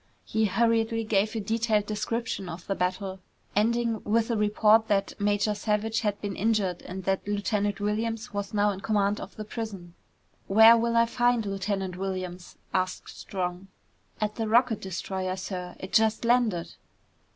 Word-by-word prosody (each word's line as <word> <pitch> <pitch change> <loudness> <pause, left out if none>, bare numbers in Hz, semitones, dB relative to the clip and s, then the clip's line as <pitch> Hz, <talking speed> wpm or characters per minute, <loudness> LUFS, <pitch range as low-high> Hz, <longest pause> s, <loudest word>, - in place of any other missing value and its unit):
He 220 0 +1
hurriedly 225 +1 +1
gave 215 0 +1
a - - 0
detailed 220 0 +1
description 215 -2 -3
of 170 +1 -8
the 195 - -1
battle, 190 +1 -2 0.4
ending 230 +1 +1
with 225 +2 +1
a - - +1
report 215 +1 +4
that 200 -3 +1
Major 205 +1 +2
Savage 210 +1 0
had 205 -2 -1
been 200 -2 -3
injured 200 -4 0
and 190 +1 -7
that 190 +1 -1
Lieutenant 205 0 -1
Williams 225 +3 -2
was 200 -1 -3
now 205 0 +2
in 190 - -6
command 205 -1 +1
of 195 - -9
the 215 - -6
prison. 205 -6 -6 0.5
"Where 220 +3 +8
will 235 0 +1
I 230 - +6
find 240 -1 +1
Lieutenant 195 -2 -2
Williams?" 185 -2 -5 0.2
asked 185 0 -1
Strong. 180 0 -4 0.5
"At 210 0 -2
the 225 -1 -1
rocket 230 0 +3
destroyer, 185 0 -3
sir. 180 -1 -5
It 190 - -8
just 220 +1 +3
landed." 230 -8 +2
210 Hz, 160 wpm, -27 LUFS, 195-225 Hz, 0.5 s, Where